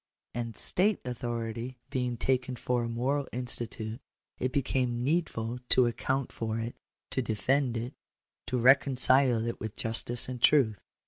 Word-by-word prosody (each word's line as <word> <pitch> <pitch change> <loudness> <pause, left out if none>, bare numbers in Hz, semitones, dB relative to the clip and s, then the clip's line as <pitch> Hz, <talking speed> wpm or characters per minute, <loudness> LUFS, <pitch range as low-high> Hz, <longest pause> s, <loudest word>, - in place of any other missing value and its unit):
And 115 -2 -4
state 205 +3 +1
authority 120 0 -4
being 125 -3 -1
taken 130 +1 0
for 125 0 -1
a 115 - -3
moral 135 +4 -1
institute, 120 -1 -2 0.4
it 130 - -1
became 125 -3 0
needful 125 -6 -1
to 130 - +5
account 130 +3 -1
for 110 -1 -3
it, 115 +1 -4 0.4
to 130 - 0
defend 125 +3 0
it, 120 +4 -4 0.5
to 130 - -1
reconcile 130 -1 +5
it 115 - -3
with 110 -1 -5
justice 115 +1 0
and 125 -2 -6
truth. 115 -10 +4
125 Hz, 140 wpm, -29 LUFS, 115-130 Hz, 0.5 s, to